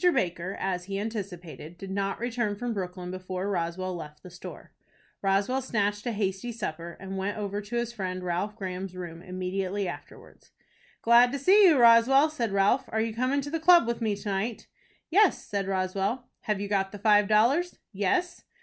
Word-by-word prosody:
Baker, 175 - -2
as 180 -2 -2
he 195 0 -3
anticipated, 180 -6 -6
did 195 +1 -8
not 195 0 -2
return 235 -3 -1
from 240 +3 -3
Brooklyn 180 -2 -5
before 185 +1 -4
Roswell 180 +1 -2
left 150 -3 -9
the 180 - -11
store. 180 - -10 0.5
Roswell 200 +7 +1
snatched 210 -3 -1
a - - +1
hasty 200 +2 -2
supper, 170 -6 -5
and 195 0 -5
went 200 +2 -2
over 205 -1 -3
to 210 +3 -7
his 235 0 -1
friend, 185 -4 -4
Ralph 180 +4 -2
Graham's 185 -2 -5
room, 170 -2 -7
immediately 185 +2 -3
afterwards. 175 - -10 0.5
"Glad 240 +1 +6
to - - -1
see 385 +8 +6
you, 320 -5 +5
Roswell," 245 +5 +6
said 235 -8 -2
Ralph; 200 +6 +2
"are 220 - -2
you 225 0 -1
coming 255 +5 0
to 285 +1 -6
the 325 - -1
club 345 -1 +6
with 235 0 -2
me 215 -2 0
to 205 - -9
night?" 205 +3 -2 0.5
"Yes," 405 +3 +4
said 200 -3 -2
Roswell. 195 +6 -1 0.2
"Have 210 -2 0
you 200 - -3
got 195 -1 0
the 205 - -7
five 210 0 +4
dollars?" 255 - +3 0.2
"Yes." 205 - -1
200 Hz, 185 wpm, -27 LUFS, 185-235 Hz, 0.5 s, Glad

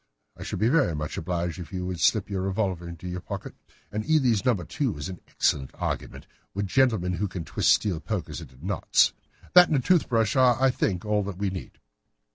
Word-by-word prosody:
I - - -14
should - - -4
be 110 - +2
very 135 - +3
much 75 0 -4
obliged 85 -2 -3
if 85 - -8
you 90 -1 -3
would 90 -2 -4
slip 80 +7 +3
your 100 -2 -3
revolver 95 -3 -2
into 85 +1 -8
your 90 0 -4
pocket. - - -6 0.4
An 105 - -2
Eley's 130 -9 +3
No. 125 -2 +3
2 100 - -3
is 75 +3 -5
an 90 -3 -7
excellent 65 -2 0
argument - - -4 0.3
with 100 0 -1
gentlemen 105 -5 +2
who 100 +4 -1
can 90 -3 -6
twist - - 0
steel 95 -7 +2
pokers 95 -4 -4
into 65 +5 -13
knots. 95 -2 +3 0.4
That 180 0 +9
and 150 - +2
a - - +3
tooth 175 +5 +2
brush 115 -4 +2
are, 125 -3 +4
I 135 0 +4
think, 95 -5 -1
all 105 0 +1
that 100 -3 -5
we 100 -1 -1
need." 95 -3 -8
95 Hz, 215 wpm, -26 LUFS, 90-115 Hz, 0.4 s, That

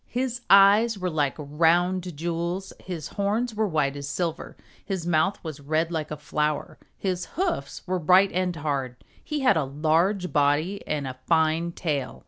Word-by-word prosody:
His 245 -1 -2
eyes 205 +3 +6
were 180 -2 -2
like 145 -3 0
round 170 +3 +1
jewels, 170 +3 -3
his 170 -6 -6
horns 215 +4 -1
were 215 0 0
white 150 -5 0
as 140 0 -6
silver, 170 -1 -3 0.3
his 190 -4 -4
mouth 175 +4 +2
was 155 -4 -6
red 155 +4 -1
like 155 -2 -3
a 150 - -5
flower, 150 0 -2 0.2
his 185 -2 -2
hoofs 360 -1 -2
were 185 -1 -1
bright 185 +4 +5
and 180 0 -1
hard. 140 -5 -2 0.3
He 300 -2 -3
had 255 -9 +4
a 160 - +2
large 165 +7 0
body 150 +6 +1
and 150 -2 -2
a 130 0 -7
fine 165 +1 +2
tail. 145 -8 -3
170 Hz, 165 wpm, -25 LUFS, 150-190 Hz, 0.3 s, eyes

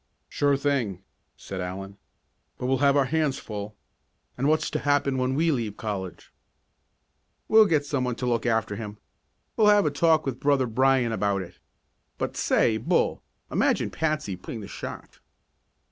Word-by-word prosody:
"Sure 145 -1 +1
thing," 125 -10 -1 0.3
said 95 -1 -6
Allen. 95 +2 -6 0.6
"But - - -5
we'll 130 0 +1
have 140 0 +4
our 140 - +4
hands 150 -1 0
full. 105 -1 -7 0.6
And 135 +3 0
what's 155 +1 +1
to - - -1
happen 140 -2 +1
when 130 +1 0
we 165 +3 +2
leave 115 -7 -2
college?" 95 -5 -6 1.1
"We'll 220 -1 +6
get 150 -5 +1
some 140 -3 -1
one 125 -1 -2
to 125 - -4
look 120 0 0
after 110 -3 0
him 105 0 -7 0.6
We'll 215 - +4
have 205 -1 +5
a 150 - +2
talk 160 +1 +3
with 130 -2 -3
Brother 140 -2 +2
Brian 130 0 +2
about 100 -3 0
it. 90 0 -14 0.6
But, - - -3
say, 110 - +2
Bull, 110 - 0 0.3
imagine - - +1
Patsy 155 -11 -1
putting 110 +5 -8
the 100 - -8
shot!" - - -8
130 Hz, 160 wpm, -26 LUFS, 105-145 Hz, 1.1 s, We'll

